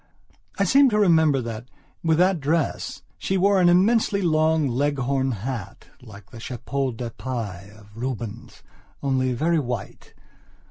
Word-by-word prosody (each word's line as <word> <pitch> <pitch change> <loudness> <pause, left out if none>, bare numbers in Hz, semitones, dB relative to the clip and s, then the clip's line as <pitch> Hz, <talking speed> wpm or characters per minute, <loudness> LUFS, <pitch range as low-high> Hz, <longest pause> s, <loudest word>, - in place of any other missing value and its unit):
I 200 - +2
seem 270 +8 +5
to 210 - 0
remember 160 -8 +4
that, 115 +1 -7 0.3
with 160 -1 +2
that 180 0 +3
dress, 155 +2 -1 0.2
she 190 - -1
wore 195 +1 +3
an 175 - +5
immensely 200 +3 +3
broad 160 -2 +2
Leghorn 135 0 0
hatlike 110 -1 -8
the 115 - -10
Chapeau 130 +3 -3
de 115 0 -6
Paille 105 -6 -6
of 105 0 -18
Rubens, 120 -2 -6 0.4
only 130 -2 +1
very 160 +6 +1
white. 120 -7 -6
135 Hz, 135 wpm, -24 LUFS, 120-170 Hz, 0.4 s, seem